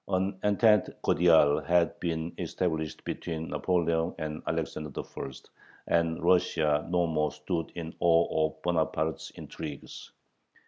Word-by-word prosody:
An 95 Hz, 0 st, -1 dB
entente 105 Hz, -1 st, +3 dB
cordiale 80 Hz, -3 st, +5 dB
had 85 Hz, +3 st, +2 dB
been 80 Hz, -1 st, -2 dB
established 80 Hz, -4 st, -2 dB
between 80 Hz, -1 st, -4 dB
Napoleon 85 Hz, -2 st, 0 dB
and 75 Hz, 0 st, -4 dB
Alexander 75 Hz, 0 st, -2 dB
I., -, -, -6 dB, 0.6 s
and 85 Hz, 0 st, +1 dB
Russia 80 Hz, -4 st, +2 dB
no 90 Hz, 0 st, +2 dB
more 75 Hz, -2 st, 0 dB
stood 80 Hz, +2 st, -3 dB
in 85 Hz, -1 st, -6 dB
awe 80 Hz, -2 st, +3 dB
of -, -, -13 dB
Bonaparte's 80 Hz, -2 st, -1 dB
"intrigues." 75 Hz, -3 st, -8 dB
80 Hz, 120 wpm, -29 LUFS, 80-90 Hz, 0.6 s, cordiale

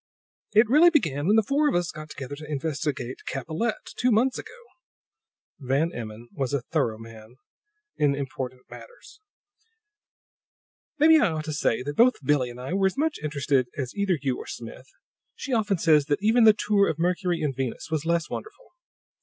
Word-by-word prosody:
"It 220 Hz, +2 st, +5 dB
really 305 Hz, +9 st, +6 dB
began 160 Hz, -, 0 dB
when 210 Hz, -, +4 dB
the 220 Hz, -, +4 dB
four 290 Hz, +6 st, +2 dB
of -, -, -1 dB
us 175 Hz, 0 st, 0 dB
got 155 Hz, -1 st, -10 dB
together 140 Hz, -1 st, -7 dB
to 155 Hz, 0 st, -9 dB
investigate 145 Hz, -4 st, -3 dB
Capellette, 160 Hz, -, -3 dB
two 250 Hz, -, +3 dB
months 245 Hz, +3 st, +2 dB
ago." 445 Hz, +3 st, -10 dB, 1.0 s
Van 140 Hz, +5 st, 0 dB
Emmon 115 Hz, 0 st, -8 dB
was 140 Hz, 0 st, -2 dB
a 140 Hz, -, -1 dB
thorough 120 Hz, -4 st, -1 dB
man 115 Hz, +1 st, -13 dB, 0.6 s
in 145 Hz, -2 st, +2 dB
important 130 Hz, -2 st, -5 dB
matters. 480 Hz, -3 st, -14 dB, 1.8 s
"Maybe 315 Hz, +2 st, +6 dB
I 220 Hz, -, +3 dB
ought 155 Hz, -1 st, -4 dB
to 155 Hz, -, -4 dB
say 125 Hz, -4 st, 0 dB
that 145 Hz, +2 st, -5 dB
both 250 Hz, +2 st, +5 dB
Billie 130 Hz, -3 st, +2 dB
and 120 Hz, +1 st, -10 dB
I 130 Hz, +7 st, -5 dB
were 195 Hz, 0 st, +3 dB
as 190 Hz, -, -4 dB
much 310 Hz, +1 st, 0 dB
interested 140 Hz, -4 st, 0 dB
as 130 Hz, -3 st, -4 dB
either 200 Hz, -4 st, 0 dB
you 135 Hz, -2 st, -2 dB
or -, -, -9 dB
Smith; 120 Hz, +3 st, -9 dB, 0.5 s
she 275 Hz, -, -5 dB
often 210 Hz, -4 st, +1 dB
says 155 Hz, -3 st, +4 dB
that 145 Hz, +6 st, -1 dB
even 225 Hz, +2 st, +4 dB
the 215 Hz, -, +8 dB
tour 205 Hz, -1 st, +2 dB
of 150 Hz, -, -2 dB
Mercury 175 Hz, 0 st, 0 dB
and 140 Hz, -3 st, -1 dB
Venus 130 Hz, +3 st, -4 dB
was 155 Hz, -2 st, -1 dB
less 170 Hz, -1 st, 0 dB
wonderful. 435 Hz, +3 st, -8 dB
155 Hz, 180 wpm, -25 LUFS, 135-210 Hz, 1.8 s, the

